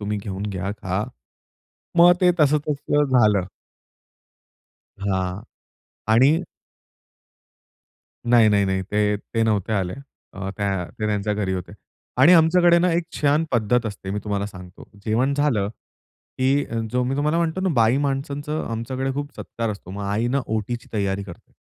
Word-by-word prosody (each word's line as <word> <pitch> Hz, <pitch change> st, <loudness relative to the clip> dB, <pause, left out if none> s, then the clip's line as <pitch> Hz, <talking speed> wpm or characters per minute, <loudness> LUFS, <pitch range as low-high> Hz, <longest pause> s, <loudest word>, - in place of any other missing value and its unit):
तुम्ही 105 Hz, 0 st, -2 dB
घेऊन 100 Hz, -1 st, -6 dB
घ्या 95 Hz, 0 st, -3 dB
खा. 100 Hz, -1 st, -3 dB, 0.9 s
मग 175 Hz, +1 st, +8 dB
ते 180 Hz, -1 st, +5 dB
तसं-तसं 150 Hz, 0 st, +2 dB
झालं. 105 Hz, -7 st, +4 dB, 1.5 s
हां 95 Hz, 0 st, -2 dB, 0.7 s
आणि 130 Hz, +5 st, +6 dB, 2.0 s
नाही, 115 Hz, -3 st, +6 dB
नाही, 100 Hz, -1 st, +3 dB
नाही, 95 Hz, 0 st, 0 dB
ते, 105 Hz, +1 st, 0 dB
ते 115 Hz, +3 st, -3 dB
नव्हते 110 Hz, -1 st, 0 dB
आले. 95 Hz, -3 st, -1 dB, 0.4 s
अ, 95 Hz, -1 st, -5 dB
त्या 100 Hz, -3 st, -1 dB
ते 110 Hz, -, -1 dB
त्यांच्या 105 Hz, 0 st, -1 dB
घरी 100 Hz, -2 st, -1 dB
होते. 90 Hz, -2 st, -5 dB, 0.5 s
आणि 150 Hz, +7 st, +8 dB
आमच्याकडे 170 Hz, +1 st, +5 dB
ना 180 Hz, +1 st, +2 dB
एक 170 Hz, +1 st, +1 dB
छान 150 Hz, +2 st, +2 dB
पद्धत 120 Hz, 0 st, +1 dB
असते, 100 Hz, -2 st, -6 dB
मी 105 Hz, -, -2 dB
तुम्हाला 100 Hz, -1 st, -2 dB
सांगतो, 90 Hz, -3 st, -12 dB, 0.2 s
जेवण 120 Hz, +6 st, +1 dB
झालं 135 Hz, -9 st, +1 dB, 0.7 s
की 135 Hz, +2 st, +2 dB, 0.3 s
जो 125 Hz, 0 st, +1 dB
मी 135 Hz, +2 st, -1 dB
तुम्हाला 150 Hz, +3 st, +1 dB
म्हणतो 170 Hz, +2 st, -1 dB
ना 190 Hz, -, +1 dB
बाई 115 Hz, 0 st, +4 dB
माणसांच 140 Hz, +1 st, -2 dB
आमच्याकडे 130 Hz, -1 st, -3 dB
खूप 145 Hz, +1 st, -4 dB
सत्कार 115 Hz, -1 st, -4 dB
असतो. 100 Hz, -3 st, -8 dB
मग 100 Hz, +2 st, -6 dB
आई 105 Hz, +4 st, 0 dB
ना 135 Hz, +3 st, +1 dB
ओटीची 110 Hz, +2 st, -3 dB
तयारी 100 Hz, -2 st, -1 dB
करते. 90 Hz, -3 st, -12 dB
110 Hz, 145 wpm, -23 LUFS, 100-140 Hz, 2.0 s, मग